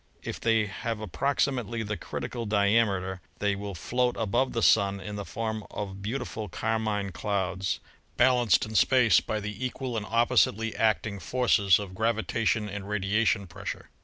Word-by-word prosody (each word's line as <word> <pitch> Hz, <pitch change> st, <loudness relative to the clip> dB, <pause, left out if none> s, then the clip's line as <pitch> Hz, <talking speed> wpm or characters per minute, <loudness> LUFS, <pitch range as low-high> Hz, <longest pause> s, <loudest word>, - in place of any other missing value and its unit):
If -, -, -5 dB
they 115 Hz, -2 st, +2 dB
have 105 Hz, +2 st, -4 dB
approximately 120 Hz, -, -1 dB
the 105 Hz, 0 st, -3 dB
criti -, -, -5 dB
cal 120 Hz, -3 st, -4 dB
diameter 100 Hz, -3 st, +2 dB, 0.2 s
they 100 Hz, -1 st, 0 dB
will 100 Hz, -1 st, -6 dB
float 125 Hz, +7 st, 0 dB
above 120 Hz, +5 st, +1 dB
the 115 Hz, -, -1 dB
Sun 100 Hz, -2 st, +4 dB
in 105 Hz, +2 st, -6 dB
the 100 Hz, -, -4 dB
form 110 Hz, 0 st, -4 dB
of 100 Hz, -1 st, -6 dB
beautiful 110 Hz, -1 st, -4 dB
carmine 105 Hz, -1 st, -1 dB
clouds, 95 Hz, -1 st, -2 dB, 0.4 s
balanced 120 Hz, -5 st, +4 dB
in 110 Hz, -, -8 dB
space 115 Hz, -3 st, +5 dB
by 110 Hz, -, -3 dB
the 105 Hz, +3 st, -5 dB
equal 130 Hz, -1 st, -3 dB
and 105 Hz, -1 st, -3 dB
oppositely 115 Hz, -1 st, +2 dB
acting 110 Hz, -2 st, +1 dB
forces 100 Hz, -2 st, +3 dB
of 100 Hz, -3 st, -6 dB
gravitation 110 Hz, 0 st, 0 dB
and 100 Hz, 0 st, -6 dB
radiation 105 Hz, 0 st, +1 dB
pressure. 85 Hz, -, -7 dB
105 Hz, 155 wpm, -28 LUFS, 100-115 Hz, 0.4 s, space